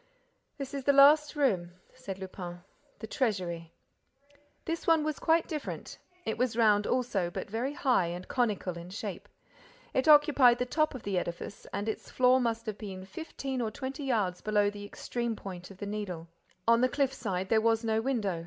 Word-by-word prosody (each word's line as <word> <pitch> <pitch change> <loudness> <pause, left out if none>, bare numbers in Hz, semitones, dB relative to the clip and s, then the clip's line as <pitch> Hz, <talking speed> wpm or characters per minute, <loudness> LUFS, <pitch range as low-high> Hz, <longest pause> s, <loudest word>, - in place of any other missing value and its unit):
"This 275 -2 -6
is 275 -1 -3
the 280 - +4
last 295 +2 +7
room," 190 -12 +1 0.2
said 205 -7 -7
Lupin. 180 -2 -7 0.3
"The - - -7
treasury." 180 - -2 0.9
This 330 0 -3
one 325 -2 +5
was 310 -1 -2
quite 325 0 +3
different. 305 -4 -5 0.3
It 220 - -2
was 245 -2 0
round 210 -3 +4
also, 225 -8 0
but 175 - -6
very 245 +6 -1
high 250 -12 +2
and 175 +2 -6
conical 205 -8 -1
in 170 +1 -9
shape. 200 -1 -6 0.6
It 260 - +1
occupied 290 -5 +7
the 250 - 0
top 310 +3 +1
of 250 - -8
the 195 -3 0
edifice 175 +3 -6
and 205 - -3
its 220 - -4
floor 255 0 +4
must 230 -1 -1
have 215 -2 -5
been 190 -3 -7
fifteen 265 +3 -5
or 225 - 0
twenty 265 +5 -6
yards 205 -9 0
below 205 -1 +2
the 205 0 -8
extreme 235 +2 -3
point 180 -3 -8
of 195 - -12
the 205 - -5
Needle. 200 -5 -5 0.4
On 230 +1 +5
the 255 - +4
cliff 275 0 +1
side 190 -3 -3
there 220 -1 +4
was 225 0 +2
no 220 -1 +1
window. 220 -9 -1
225 Hz, 185 wpm, -30 LUFS, 195-260 Hz, 0.9 s, last